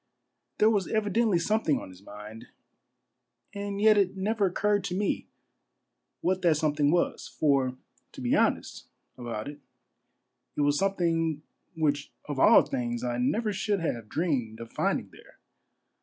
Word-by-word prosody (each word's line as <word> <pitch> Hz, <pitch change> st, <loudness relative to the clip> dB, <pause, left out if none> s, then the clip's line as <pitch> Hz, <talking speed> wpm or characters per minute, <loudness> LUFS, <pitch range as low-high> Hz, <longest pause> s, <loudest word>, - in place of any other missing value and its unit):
There 215 Hz, +1 st, +5 dB
was 200 Hz, -5 st, 0 dB
evidently 215 Hz, -1 st, +1 dB
something 170 Hz, -4 st, +1 dB
on -, -, -9 dB
his 90 Hz, +1 st, -15 dB
mind, 105 Hz, +2 st, -11 dB, 1.1 s
and 200 Hz, -1 st, -4 dB
yet 215 Hz, 0 st, +5 dB
it 195 Hz, 0 st, 0 dB
never 205 Hz, +1 st, +1 dB
occurred 205 Hz, +2 st, +1 dB
to 180 Hz, -1 st, -2 dB
me 205 Hz, 0 st, -1 dB, 0.9 s
what 185 Hz, +1 st, 0 dB
that 165 Hz, -4 st, +3 dB
something 150 Hz, -1 st, +1 dB
was; 170 Hz, +2 st, 0 dB
for 135 Hz, -4 st, +1 dB, 0.4 s
to -, -, -10 dB
be -, -, +1 dB
honest -, -, 0 dB, 0.3 s
about 115 Hz, -3 st, -5 dB
it, 145 Hz, 0 st, -8 dB, 1.0 s
it -, -, +1 dB
was 145 Hz, 0 st, +2 dB
something 165 Hz, -5 st, 0 dB, 0.3 s
which 145 Hz, -3 st, 0 dB
of 145 Hz, -3 st, -4 dB
all -, -, +7 dB
things 120 Hz, -1 st, -3 dB
I 120 Hz, -1 st, -2 dB
never 210 Hz, -, 0 dB
should 200 Hz, +1 st, -1 dB
have 115 Hz, -9 st, -3 dB
dreamed 130 Hz, -10 st, -1 dB
of 115 Hz, 0 st, -9 dB
finding -, -, -1 dB
there. -, -, -18 dB
165 Hz, 145 wpm, -28 LUFS, 130-200 Hz, 1.1 s, all